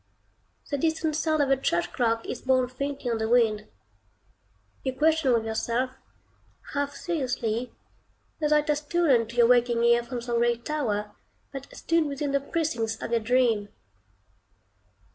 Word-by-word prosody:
The 285 - 0
distant 320 0 0
sound 310 -1 +1
of 275 - 0
a - - +6
church 170 -9 -1
clock 230 -2 0
is - - -5
borne 260 -1 +2
faintly 275 -1 -4
on 225 - -1
the 220 0 -1
wind. 220 -3 +2 1.1
You 260 - -2
question 315 -2 +3
with 230 -2 +2
yourself, 235 +3 -1 0.8
half 285 0 -2
seriously, 250 -7 -2 0.7
whether 300 -1 +3
it 300 +1 0
has 300 -1 +1
stolen 295 -7 +2
to 235 - -10
your 240 -1 +5
waking 240 -1 +3
ear 235 0 +5
from 240 +1 -5
some 235 0 -2
gray 240 0 +2
tower, 230 -6 -2 0.4
that 275 0 -7
stood 330 -2 +1
within 280 0 -3
the 280 - +2
precincts 245 -8 -2
of - - -5
your 235 - +3
dream. 225 -3 +1
250 Hz, 155 wpm, -26 LUFS, 230-290 Hz, 1.1 s, a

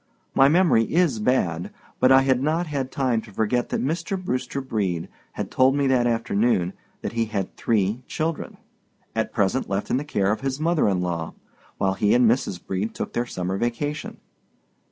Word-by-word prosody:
My 135 +1 +6
memory 160 -9 +3
is 165 -9 +2
bad; 90 -8 0 0.3
but 130 - +5
I 135 0 +7
had 130 -2 +2
not 160 +5 +1
had 140 -4 -3
time 125 -5 0
to 110 -1 -14
forget 110 +4 0
that - - -1
Mr. 170 +6 -2
Brewster 130 -6 -3
Brede 100 -10 -2 0.2
had - - -5
told 130 +1 +4
me 140 -1 +1
that 130 -2 +3
afternoon 115 -5 +1 0.3
that - - -2
he 115 0 0
had 105 -4 -4
three 110 +1 0
children, 160 0 -3 0.6
at - - -1
present - - 0
left 100 +1 -2
in - - +3
the 140 - -2
care 100 -9 0
of 110 - -2
his 135 0 -2
mother 160 -6 +2
in 95 -2 0
law, 85 -2 -3 0.4
while 95 -1 +1
he 105 +3 +2
and 125 -1 +5
Mrs. 110 -6 +1
Brede 95 +4 -3
took - - -4
their 120 +1 -1
summer 95 -2 -3
vacation. 145 +6 -3
120 Hz, 185 wpm, -24 LUFS, 100-135 Hz, 0.6 s, I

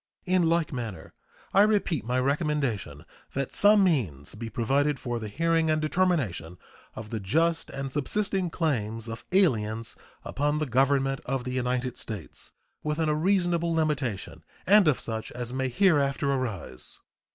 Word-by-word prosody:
In 180 -3 +3
like 165 -2 +1
manner 110 -10 -6 0.4
I 195 - +6
repeat 205 - +2
my 125 +3 0
recommendation 135 - -1 0.3
that 135 -1 -2
some 205 0 +6
means 100 - 0
be 115 +2 -6
provided 135 +5 +1
for 120 -1 -3
the 110 - -5
hearing 165 +7 +1
and 155 0 +2
determination 150 - 0 0.4
of 110 -1 -8
the 115 - -2
just 165 - 0
and 135 0 -5
subsisting 190 +6 -1
claims 115 -9 -2
of 115 0 -7
aliens 115 - +1 0.3
upon 145 +2 0
the 155 - 0
Government 135 +1 +1
of 130 -1 -1
the 125 0 -4
United 125 0 -1
States 105 -7 -7 0.3
within 155 +1 -1
a - - +2
reasonable 175 0 +1
limitation, 145 -10 -2 0.2
and 205 -1 +6
of 150 - +3
such 110 -1 -4
as 120 0 -4
may 130 0 -1
hereafter 140 -4 +2
arise. 105 - -4
135 Hz, 150 wpm, -27 LUFS, 115-165 Hz, 0.4 s, I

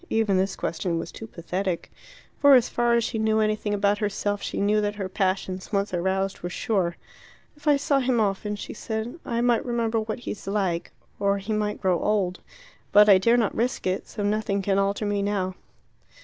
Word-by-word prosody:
Even 220 -3 +2
this 190 +1 +1
question 170 0 -2
was - - -5
too 225 - -9
pathetic. 180 -1 -3 0.5
For 285 -1 +7
as 245 -2 +4
far 240 0 +2
as 235 - +2
she 225 0 -2
knew 220 0 +2
anything 215 -1 0
about 205 0 +1
herself, 205 -1 -1
she - - -4
knew 210 +1 +2
that 205 0 -1
her 195 -2 -3
passions, 185 -1 -2
once 200 -2 0
aroused, 190 +2 -1
were 175 - -4
sure. 185 -4 -1 0.6
"If 295 +1 -13
I 290 -1 +6
saw 280 0 +1
him 255 -2 +1
often," 210 0 0
she 205 - -7
said, 220 +7 -4
"I 235 0 -1
might 240 -1 +2
remember 230 -2 0
what 220 +2 -4
he - - -4
is 205 - -9
like. 190 -4 -1 0.3
Or 200 0 +2
he 200 +3 -4
might 210 -1 -1
grow 185 -3 +2
old. 195 -4 0 0.5
But 210 +1 +7
I 190 -2 +8
dare 230 +5 +4
not 225 -4 +1
risk 240 +2 -1
it, 185 0 -1
so 205 - -5
nothing 205 -1 0
can 195 0 +2
alter 200 +2 0
me 205 -1 0
now." 200 -2 -1
205 Hz, 205 wpm, -25 LUFS, 195-225 Hz, 0.6 s, I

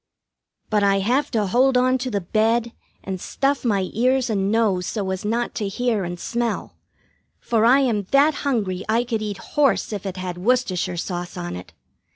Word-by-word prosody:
But 210 -1 +3
I 200 -1 +3
have 250 +9 +1
to 220 -4 0
hold 250 +6 +3
on 255 +1 +3
to 255 +1 -3
the 205 -4 -1
bed 225 +5 +1 0.3
and 190 -2 -5
stuff 275 +1 -1
my 200 -6 +1
ears 255 +1 +2
and 195 -1 0
nose 205 -6 +1
so 200 -4 -2
as 190 0 -4
not 230 +3 -1
to 210 - -2
hear 225 0 -1
and 175 0 -5
smell, 235 +3 -3 0.6
for 225 -1 +1
I 260 +4 +6
am 220 -7 0
that 285 +3 +4
hungry 205 -9 -1
I 230 +2 +3
could 230 -3 -2
eat 210 -2 -4 0.2
horse 280 -6 +2
if 200 -1 -4
it 190 -1 -5
had 180 -1 -5
Worcestershire 190 -5 0
sauce 175 +1 -4
on 175 - -4
it. 90 -1 -10
215 Hz, 190 wpm, -22 LUFS, 190-245 Hz, 0.6 s, I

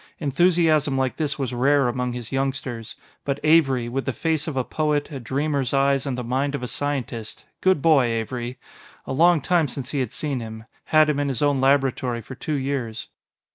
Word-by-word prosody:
Enthusiasm 155 -1 +2
like 130 -1 -1
this 150 -2 -1
was 130 -3 -3
rare 135 +2 +3
among 125 0 -2
his 120 -2 -6
youngsters. 135 -4 -3 0.3
But 140 0 -2
Avery 140 -6 +4
with 135 +3 -3
the 135 - -1
face 160 +1 -1
of 150 -4 -3
a 130 - +2
poet, 150 +1 -1
a 140 - -5
dreamer's 140 +1 -1
eyes 135 0 +2
and 130 -2 -2
the 125 - -3
mind 135 +4 -1
of 140 - -5
a - - -2
scientist 125 -6 -4 0.2
good 185 -6 +3
boy, 155 -6 +5
Avery! 120 +2 -3 0.5
a - - -4
long 170 +2 +4
time 170 0 +2
since 130 -1 -6
he 145 - -1
had 125 -4 -1
seen 145 -4 -2
him 110 -1 -8 0.2
had 155 -1 +5
him 150 -2 0
in 145 - 0
his 135 -1 -1
own 145 -2 +2
laboratory 135 -3 +1
for 130 - -9
two 150 +4 -3
years.... 130 -5 -3
135 Hz, 200 wpm, -23 LUFS, 125-150 Hz, 0.5 s, boy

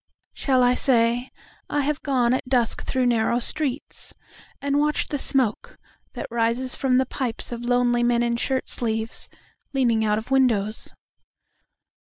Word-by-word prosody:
……..Shall 260 -3 +2
I 245 0 +4
say, 245 -1 +2 0.4
I 290 - +1
have 295 +1 -1
gone 250 -4 +1
at 260 0 -2
dusk 245 -3 +1
through 260 -1 0
narrow 235 -1 +2
streetsAnd 280 +2 0 0.7
watched 300 +1 0
the 290 - -1
smoke 260 -7 -1 0.4
that - - -5
rises 235 +2 +1
from 255 -2 +1
the 260 - +3
pipesOf 240 -2 -4
lonely 245 0 +2
men 240 0 +2
in 235 0 0
shirt 260 +2 -1
sleeves, 225 -1 -3 0.4
leaning 235 -5 +2
out 210 -1 +1
of 220 +5 -6
windows? 225 -6 +1
245 Hz, 140 wpm, -24 LUFS, 235-265 Hz, 0.7 s, I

